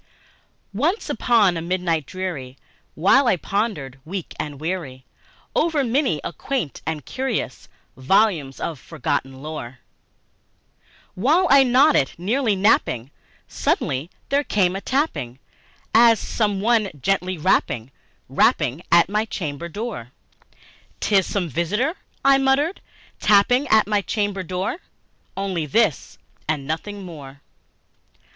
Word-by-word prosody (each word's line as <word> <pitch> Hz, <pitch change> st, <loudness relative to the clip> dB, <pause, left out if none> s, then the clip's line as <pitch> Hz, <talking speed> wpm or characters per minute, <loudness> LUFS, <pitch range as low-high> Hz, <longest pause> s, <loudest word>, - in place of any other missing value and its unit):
Once 315 Hz, -, 0 dB
upon 215 Hz, -7 st, +3 dB
a 165 Hz, -, -3 dB
midnight 170 Hz, -4 st, -1 dB
dreary, 165 Hz, -9 st, -5 dB, 0.4 s
while 220 Hz, -, +4 dB
I 190 Hz, -, +3 dB
pondered, 165 Hz, -, -3 dB
weak 180 Hz, +2 st, -6 dB
and 150 Hz, -2 st, -5 dB
weary, 155 Hz, -6 st, -4 dB, 0.5 s
Over 315 Hz, -3 st, +2 dB
many 250 Hz, -, +1 dB
a -, -, -4 dB
quaint 260 Hz, -, -3 dB
and 155 Hz, -4 st, -3 dB
curious 260 Hz, -, -3 dB, 0.3 s
volume 160 Hz, +1 st, +2 dB
of 160 Hz, -5 st, -4 dB
forgotten 135 Hz, -3 st, -3 dB
lore 150 Hz, -5 st, -6 dB, 1.4 s
While 300 Hz, -, +3 dB
I 275 Hz, 0 st, +8 dB
nodded, 260 Hz, -, +4 dB
nearly 215 Hz, +5 st, +1 dB
napping, 140 Hz, -, +2 dB, 0.4 s
suddenly 135 Hz, +6 st, -1 dB, 0.2 s
there 280 Hz, +1 st, +2 dB
came 190 Hz, -8 st, +1 dB
a 195 Hz, -, -4 dB
tapping, 155 Hz, -, -1 dB, 0.6 s
As 230 Hz, -1 st, +6 dB
of -, -, -7 dB
some 205 Hz, -3 st, 0 dB
one 220 Hz, -2 st, +2 dB
gently 185 Hz, +5 st, 0 dB
rapping, 125 Hz, -5 st, 0 dB, 0.4 s
rapping 135 Hz, +7 st, +2 dB
at 170 Hz, 0 st, +6 dB
my 210 Hz, +3 st, 0 dB
chamber 170 Hz, -6 st, -5 dB
door" 200 Hz, -, -6 dB, 0.9 s
'Tis 195 Hz, -3 st, +2 dB
some 195 Hz, -4 st, -1 dB
visitor," 200 Hz, -, -1 dB, 0.3 s
I 275 Hz, 0 st, +6 dB
muttered, 275 Hz, +6 st, +1 dB, 0.4 s
"tapping 230 Hz, +7 st, +4 dB
at 220 Hz, -3 st, +5 dB
my 210 Hz, 0 st, +1 dB
chamber 205 Hz, 0 st, -2 dB
door 185 Hz, -, -3 dB, 0.6 s
Only 185 Hz, -5 st, -2 dB
this, 195 Hz, -, +1 dB, 0.3 s
and 150 Hz, -3 st, -1 dB
nothing 195 Hz, +7 st, -4 dB
more." 145 Hz, -6 st, -10 dB
190 Hz, 120 wpm, -22 LUFS, 155-230 Hz, 1.4 s, I